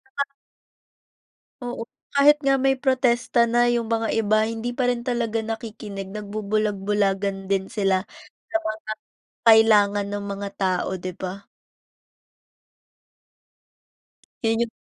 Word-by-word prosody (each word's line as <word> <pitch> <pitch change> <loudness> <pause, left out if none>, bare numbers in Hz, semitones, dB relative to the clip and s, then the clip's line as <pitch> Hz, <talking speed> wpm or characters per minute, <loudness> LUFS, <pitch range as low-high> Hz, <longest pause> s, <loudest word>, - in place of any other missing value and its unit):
Kapag 280 0 0 1.4
Oo. 245 -1 -5 0.3
Kahit 285 +1 +6
nga 275 0 +5
may 270 0 +2
protesta 250 -3 +2
na 240 +1 +3
yung 235 -2 0
mga 225 -1 0
iba, 215 0 +2
hindi 230 +2 -3
pa 245 0 +1
rin 245 -1 -1
talaga 235 -3 -1
nakikinig, 215 -3 -6
nagbubulag-bulagan 200 -1 -1
din 195 -1 +1
sila 195 -2 +1 0.4
sa 330 - +2
mga 215 0 -4 0.5
kailangan 210 -3 +6
ng 205 0 -4
mga 200 0 -5
tao, 185 -2 0
'di 185 0 -6
ba? 190 +2 -6 3.0
'Yan 225 0 +2
yun 235 -1 0
220 Hz, 115 wpm, -24 LUFS, 200-235 Hz, 3.0 s, Kahit